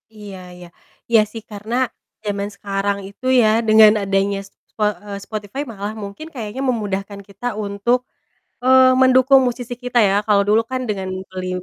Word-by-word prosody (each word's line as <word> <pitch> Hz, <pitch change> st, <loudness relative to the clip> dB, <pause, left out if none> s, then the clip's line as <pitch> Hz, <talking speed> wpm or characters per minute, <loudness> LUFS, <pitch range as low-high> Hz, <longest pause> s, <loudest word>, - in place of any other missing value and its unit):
Iya 205 Hz, -3 st, -9 dB, 0.2 s
iya. 180 Hz, 0 st, -12 dB, 0.4 s
Iya 225 Hz, -2 st, +6 dB
sih, 225 Hz, 0 st, -7 dB
karena 210 Hz, +3 st, -5 dB, 0.5 s
jaman 200 Hz, -1 st, -2 dB
sekarang 200 Hz, 0 st, -2 dB
itu 200 Hz, +6 st, -13 dB, 0.2 s
ya 220 Hz, -, +4 dB, 0.2 s
dengan 215 Hz, 0 st, +8 dB
adanya 195 Hz, 0 st, 0 dB
s -, -, -17 dB, 0.2 s
spo 215 Hz, -, -3 dB, 0.2 s
eee, 205 Hz, -, -7 dB
Spotify 215 Hz, +5 st, -5 dB
malah 205 Hz, 0 st, -5 dB
mungkin 200 Hz, +11 st, -8 dB
kayaknya 220 Hz, +2 st, -5 dB
memudahkan 200 Hz, -3 st, -3 dB
kita 200 Hz, +4 st, -11 dB, 0.2 s
untuk, 200 Hz, +5 st, 0 dB, 0.7 s
eee, 260 Hz, 0 st, +6 dB
mendukung 260 Hz, +1 st, +6 dB
musisi 245 Hz, 0 st, -4 dB
kita 245 Hz, -1 st, 0 dB
ya 195 Hz, -, +1 dB
kalo 205 Hz, -2 st, +4 dB
dulu 215 Hz, +2 st, +4 dB
kan 255 Hz, -, -2 dB
dengan 195 Hz, -2 st, -3 dB, 0.2 s
beli 185 Hz, 0 st, -6 dB
210 Hz, 160 wpm, -20 LUFS, 200-240 Hz, 0.7 s, dengan